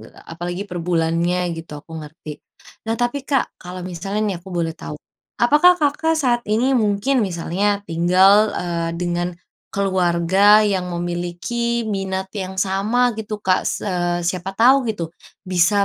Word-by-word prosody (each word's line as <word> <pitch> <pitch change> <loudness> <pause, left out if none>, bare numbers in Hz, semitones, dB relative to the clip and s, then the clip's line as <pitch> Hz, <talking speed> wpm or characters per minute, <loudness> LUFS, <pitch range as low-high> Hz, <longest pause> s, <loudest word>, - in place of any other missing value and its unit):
eee, 110 - -15
apalagi 175 +3 -5
per 180 -4 -6
bulannya 170 +1 0
gitu, 165 -2 -8
aku 160 -1 -8
ngerti. 150 0 -10 0.5
Nah 225 - 0
tapi, 245 +3 -1
Kak, 270 -3 0
kalau 180 0 -7
misalnya 190 +4 -4
nih - - -4
aku 190 - -13
boleh 170 -2 -1
tahu, 150 -2 -8 0.4
apakah 300 +9 +5
Kakak 320 +1 +1
saat 245 -5 +1
ini 240 +5 +2
mungkin 220 +3 +2
misalnya, 200 +3 -1
tinggal, 185 +5 +4
eee, 170 -1 -2
dengan 175 0 -1 0.4
keluarga 190 +2 +3
yang 185 -3 -1
memiliki 175 +7 -2
minat 190 -2 -2
yang 190 -1 -5
sama 210 +6 +1
gitu, 215 -1 -5
Kak? 185 -2 +1
Se - - -4 0.4
siapa 180 +1 -2
tahu 260 +4 +5
gitu, 175 -6 -3 0.4
bisa 185 +3 +3
190 Hz, 145 wpm, -20 LUFS, 175-215 Hz, 0.5 s, apakah